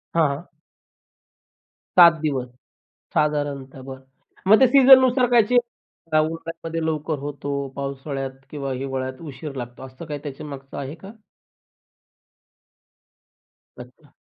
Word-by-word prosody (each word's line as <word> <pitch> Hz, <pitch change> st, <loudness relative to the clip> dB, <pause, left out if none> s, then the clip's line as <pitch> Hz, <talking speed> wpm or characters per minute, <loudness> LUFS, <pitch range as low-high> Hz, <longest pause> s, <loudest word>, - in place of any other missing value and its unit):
हां, 165 Hz, -2 st, +4 dB
हां. 140 Hz, +4 st, -4 dB, 1.5 s
7 170 Hz, -1 st, +9 dB
दिवस 135 Hz, -5 st, -1 dB, 0.7 s
साधारणतः 145 Hz, -3 st, -1 dB
बरं. 130 Hz, 0 st, -9 dB, 0.5 s
मग 215 Hz, +2 st, +7 dB
ते 260 Hz, -, +7 dB
सीझननुसार 260 Hz, -1 st, +7 dB
काय 240 Hz, -1 st, +7 dB
चेंज 245 Hz, +4 st, +3 dB, 0.6 s
उन्हाळ्यामध्ये 165 Hz, +1 st, -3 dB
लवकर 155 Hz, -1 st, -2 dB
होतो, 140 Hz, 0 st, -4 dB
पावसाळ्यात 135 Hz, 0 st, -4 dB, 0.2 s
किंवा 140 Hz, -2 st, -4 dB
हिवाळ्यात 130 Hz, 0 st, -4 dB
उशीर 145 Hz, -1 st, -8 dB
लागतो, 120 Hz, -1 st, -7 dB
असं 130 Hz, +5 st, -11 dB
काही 150 Hz, -2 st, -5 dB
त्याच्यामागचं 140 Hz, -1 st, -8 dB
आहे 140 Hz, +2 st, -5 dB
का? 190 Hz, +5 st, -12 dB, 2.7 s
अच्छा. -, -, -14 dB
145 Hz, 105 wpm, -23 LUFS, 135-165 Hz, 2.7 s, 7